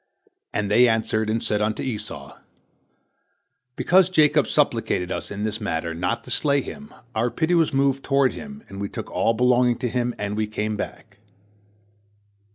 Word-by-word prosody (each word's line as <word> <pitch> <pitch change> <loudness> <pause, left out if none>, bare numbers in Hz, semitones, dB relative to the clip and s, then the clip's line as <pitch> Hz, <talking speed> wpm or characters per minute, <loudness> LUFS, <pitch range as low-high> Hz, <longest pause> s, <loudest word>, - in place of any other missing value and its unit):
And 105 -1 -2
they 125 +4 +6
answered, 110 -1 0
and 110 +1 0
said 105 0 +1
unto 105 +1 -1
Esau, 105 -5 -6 1.4
"Because 185 0 +4
Jacob 150 -7 +4
supplicated 115 -10 +1
us - - -4
in 105 +1 -5
this 110 +1 -3
matter, 85 -4 -2
not 90 +2 -2
to - - -9
slay 140 -2 +2
him, 215 - -9 0.2
our 115 +2 +1
pity 160 +7 0
was 165 -2 +3
moved 135 -1 +1
toward 135 -2 +2
him, 210 0 -9
and 100 0 -8
we 100 - -3
took - - -7
all 115 - +1
belonging 125 0 +3
to 125 - -2
him, 120 0 -1
and 105 0 -3
we 110 0 -1
came 105 0 -2
back." - - -7
115 Hz, 165 wpm, -23 LUFS, 105-140 Hz, 1.4 s, they